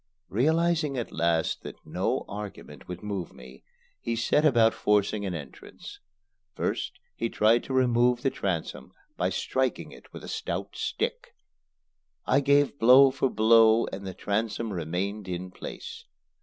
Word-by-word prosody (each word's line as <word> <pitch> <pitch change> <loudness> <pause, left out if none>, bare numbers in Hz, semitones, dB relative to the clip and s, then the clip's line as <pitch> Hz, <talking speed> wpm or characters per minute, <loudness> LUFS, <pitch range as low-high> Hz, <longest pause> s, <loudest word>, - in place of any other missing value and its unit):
Realizing 155 - +1
at 120 - -4
last 80 -1 0
that - - -8
no - - -2
argument 105 -1 -9
would 90 +1 -7
move 100 -5 -4
me, 65 +1 -14 0.4
he 115 - -3
set 120 +6 +2
about 115 -7 +4
forcing 105 0 +1
an 90 - -3
entrance. 70 -4 -10 0.6
First - - -2 0.2
he 115 - -2
tried 115 +2 +3
to 135 - -5
remove 120 -1 +3
the 135 - +2
transom 95 -10 -4 0.2
by - - 0
striking 130 -2 -2
it - - -15
with - - -10
a - - -8
stout - - -4
stick. - - -3 0.9
I 135 - +3
gave 140 0 +2
blow 130 +3 +7
for 135 0 0
blow 115 0 +5
and 95 0 -6
the 95 - -6
transom 110 +1 -2
remained 95 +4 -3
in 90 0 -5
place. 460 - -9
115 Hz, 145 wpm, -27 LUFS, 95-130 Hz, 0.9 s, blow